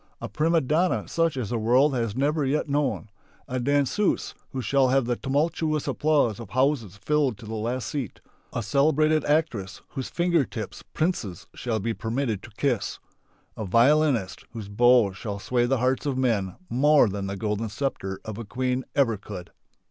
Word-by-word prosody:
A -, -, -5 dB
prima 165 Hz, +2 st, +2 dB
donna 160 Hz, +7 st, +1 dB
such 165 Hz, -4 st, 0 dB
as 120 Hz, -6 st, -3 dB
the 120 Hz, -, 0 dB
world 125 Hz, +6 st, +4 dB
has 115 Hz, -4 st, -1 dB
never 145 Hz, +3 st, +1 dB
yet 140 Hz, +3 st, 0 dB
known; 140 Hz, -6 st, -1 dB, 0.4 s
a 130 Hz, 0 st, -2 dB
danseuse, 145 Hz, -, +1 dB, 0.2 s
who 135 Hz, -, -5 dB
shall 130 Hz, +3 st, +2 dB
have 135 Hz, 0 st, +2 dB
the 120 Hz, 0 st, 0 dB
tumultuous 155 Hz, +3 st, 0 dB
applause 145 Hz, -9 st, +2 dB
of 115 Hz, -5 st, -8 dB
houses 125 Hz, -5 st, 0 dB
filled 140 Hz, 0 st, +1 dB
to 110 Hz, -, -12 dB
the 110 Hz, -, -6 dB
last 115 Hz, +3 st, -2 dB
seat; 135 Hz, -8 st, -4 dB, 0.3 s
a 115 Hz, -, -3 dB
celebrated 155 Hz, +6 st, +3 dB
actress 145 Hz, -11 st, 0 dB
whose 130 Hz, -, -5 dB
finger 170 Hz, -3 st, +2 dB
tips 110 Hz, -5 st, -7 dB
princes 155 Hz, -, -1 dB
shall 115 Hz, -3 st, -2 dB
be 115 Hz, +3 st, -1 dB
permitted 115 Hz, -2 st, -2 dB
to -, -, -11 dB
kiss; 125 Hz, -8 st, 0 dB, 0.6 s
a 110 Hz, -, -4 dB
violinist 120 Hz, 0 st, +3 dB
whose 110 Hz, -3 st, -7 dB
bow 120 Hz, 0 st, +5 dB
shall 100 Hz, +2 st, -5 dB
sway 120 Hz, +4 st, 0 dB
the 135 Hz, +1 st, +2 dB
hearts 130 Hz, +4 st, 0 dB
of 135 Hz, -2 st, -1 dB
men 105 Hz, -8 st, 0 dB
more 145 Hz, +1 st, +4 dB
than 100 Hz, -1 st, -3 dB
the 100 Hz, 0 st, -4 dB
golden 105 Hz, +1 st, -2 dB
sceptre 100 Hz, -5 st, -3 dB
of 110 Hz, 0 st, -6 dB
a -, -, -4 dB
queen 125 Hz, +3 st, -1 dB
ever 120 Hz, -6 st, +3 dB
could. 95 Hz, -3 st, -9 dB
125 Hz, 175 wpm, -26 LUFS, 110-145 Hz, 0.6 s, bow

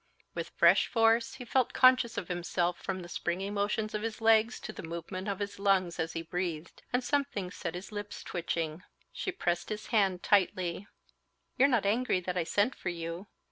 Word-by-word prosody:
With -, -, -4 dB
fresh -, -, +5 dB
force, 230 Hz, 0 st, +3 dB
he 255 Hz, -2 st, -8 dB
felt 250 Hz, 0 st, +1 dB
conscious 255 Hz, -3 st, +5 dB
of 195 Hz, -4 st, -3 dB
himself 175 Hz, 0 st, -1 dB
from 190 Hz, -1 st, -3 dB
the -, -, -9 dB
springy 180 Hz, +3 st, -2 dB
motions 210 Hz, +1 st, -1 dB
of 210 Hz, -, -2 dB
his 225 Hz, 0 st, -4 dB
legs 225 Hz, +1 st, +4 dB
to 215 Hz, -, -6 dB
the -, -, -7 dB
movements 170 Hz, +4 st, -5 dB
of 200 Hz, -, -2 dB
his 200 Hz, 0 st, -5 dB
lungs 190 Hz, -3 st, +2 dB
as 160 Hz, 0 st, -1 dB
he 165 Hz, -, -3 dB
breathed, 170 Hz, -1 st, -4 dB
and 250 Hz, +1 st, +1 dB
something 255 Hz, -10 st, -1 dB
set 170 Hz, -, -5 dB
his 180 Hz, +4 st, -7 dB
lips 205 Hz, 0 st, -6 dB
twitching. 170 Hz, -2 st, -2 dB
Joining 155 Hz, +2 st, -10 dB
him, -, -, -22 dB, 0.3 s
she 380 Hz, -, -3 dB
pressed 175 Hz, -, -1 dB
his 215 Hz, 0 st, -4 dB
hand 195 Hz, -4 st, +2 dB
tightly. 185 Hz, -1 st, +1 dB, 0.7 s
"You're 270 Hz, -, +5 dB
not 240 Hz, -7 st, +2 dB
angry 220 Hz, -1 st, +2 dB
that 180 Hz, 0 st, -4 dB
I 175 Hz, -2 st, 0 dB
sent 205 Hz, +9 st, +2 dB
for 175 Hz, -, -4 dB
you? 170 Hz, +2 st, -5 dB
195 Hz, 200 wpm, -31 LUFS, 175-225 Hz, 0.7 s, fresh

